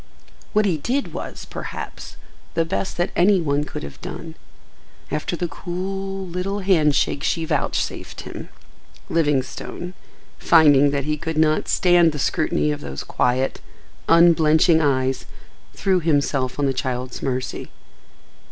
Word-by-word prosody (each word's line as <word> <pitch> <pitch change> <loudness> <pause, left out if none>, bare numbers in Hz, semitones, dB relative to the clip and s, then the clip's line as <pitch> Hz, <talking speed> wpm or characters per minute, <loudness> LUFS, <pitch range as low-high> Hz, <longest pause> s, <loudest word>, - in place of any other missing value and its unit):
What 215 -1 +3
he 175 -6 +1
did 265 - -2
was, - - -6
perhaps, - - -7 0.4
the 165 -1 +2
best 190 +3 -3
that 175 - 0
any 190 +2 +4
one 145 -3 0
could - - -7
have 70 - -9
done. - - -7 0.8
After 150 +4 -2
the 175 +1 -2
cool, 195 +3 -4
little 185 +3 -3
handshake 155 -7 +2
she 165 -1 0
vouchsafed - - -2
him, - - -8 0.6
Livingstone, 150 +3 -1 0.5
finding 145 -4 +6
that 140 -1 -1
he 150 0 -1
could 160 0 -4
not 155 0 +2
stand 175 -3 +4
the - - -4
scrutiny 150 +1 +1
of 145 0 -4
those 70 - -6
quiet, 125 +2 0 0.5
unblenching 165 -1 +5
eyes, 130 -3 0 0.5
threw 190 -2 +2
himself 140 -5 0
on 145 - +1
the 135 - +1
child's 125 -1 -3
mercy. 130 -1 -3
160 Hz, 135 wpm, -22 LUFS, 140-175 Hz, 0.8 s, finding